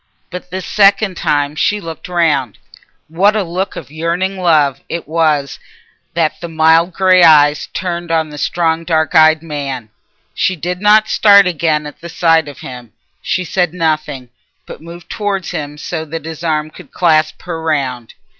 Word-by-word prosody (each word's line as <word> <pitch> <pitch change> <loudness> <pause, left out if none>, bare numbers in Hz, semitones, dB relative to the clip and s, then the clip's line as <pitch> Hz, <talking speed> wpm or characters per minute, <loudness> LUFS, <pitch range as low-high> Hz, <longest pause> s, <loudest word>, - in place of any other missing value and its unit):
But 180 0 -8
this 185 +1 -5
second 200 -1 +3
time 145 -2 -1
she 205 +6 0
looked 165 -4 -8
round. 155 - 0 0.5
What 195 +7 +2
a 215 - 0
look 185 +3 -4
of - - -9
yearning 170 +5 -2
love 150 -6 +2
it 170 - -5
was 150 -4 0 0.6
that 160 -2 -1
the 170 - -5
mild 160 +2 +3
grey 185 0 +3
eyes 150 -3 +5
turned 175 -2 -4
on 160 -2 0
the 150 - -9
strong 165 0 0
dark 160 -2 0
eyed 155 0 +5
man! 140 -7 -5 0.4
She 185 - 0
did 180 +3 -5
not 215 +1 +4
start 200 -2 +5
again 155 -3 0
at 150 - -10
the 170 - -8
sight 165 -2 +2
of 145 - -10
him; 125 -3 -10 0.3
she 185 - -2
said 180 -1 -1
nothing, 155 -6 -2 0.4
but - - -11
moved 170 +1 -12
towards 200 -3 -3
him 145 0 -5
so 160 +2 -5
that 160 +1 -7
his 165 0 -8
arm 155 -1 -1
could - - -14
clasp 155 -3 +1
her 165 -2 -5
round. 135 -7 -3
165 Hz, 170 wpm, -15 LUFS, 150-180 Hz, 0.6 s, eyes